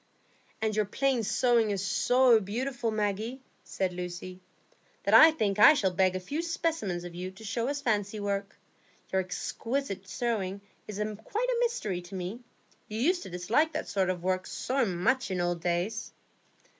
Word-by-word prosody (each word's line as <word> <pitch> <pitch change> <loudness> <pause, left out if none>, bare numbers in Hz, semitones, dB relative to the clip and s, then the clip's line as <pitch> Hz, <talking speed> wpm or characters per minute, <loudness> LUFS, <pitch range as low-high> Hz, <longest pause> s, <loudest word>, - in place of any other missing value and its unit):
"And 215 -1 0
your 215 -1 +2
plain 260 +4 +1
sewing 230 +1 +2
is 200 -1 -1
so 245 +2 +4
beautiful, 240 +5 -2
Maggie," 215 +3 -2 0.2
said 185 -2 -2
Lucy, 180 +1 -6 0.6
"that - - 0
I 320 - +10
think 215 -11 -1
I 300 +9 +9
shall 195 -9 +1
beg 185 0 +2
a - - -1
few 285 - -3
specimens 325 - -2
of 175 -1 -8
you 180 +2 -5
to 190 +4 -14
show 230 +3 -2
as 285 +1 -3
fancy 210 -2 0
work. 200 -1 -3 0.6
Your 190 - +3
exquisite 195 +3 -3
sewing 200 -3 -2 0.3
is 210 - -6 0.3
quite 475 - -1
a - - +1
mystery 335 - -1
to 175 +2 -10
me, 185 +5 -4 0.5
you 215 +1 -5
used 350 +8 +2
to - - -8
dislike 220 - +1
that 310 - -3
sort 190 -2 0
of 180 -2 -2
work 185 0 0
so 260 -2 0
much 210 +9 +1
in 185 -1 -2
old 175 -1 -1
days." 180 +5 -1
210 Hz, 170 wpm, -29 LUFS, 185-255 Hz, 0.6 s, I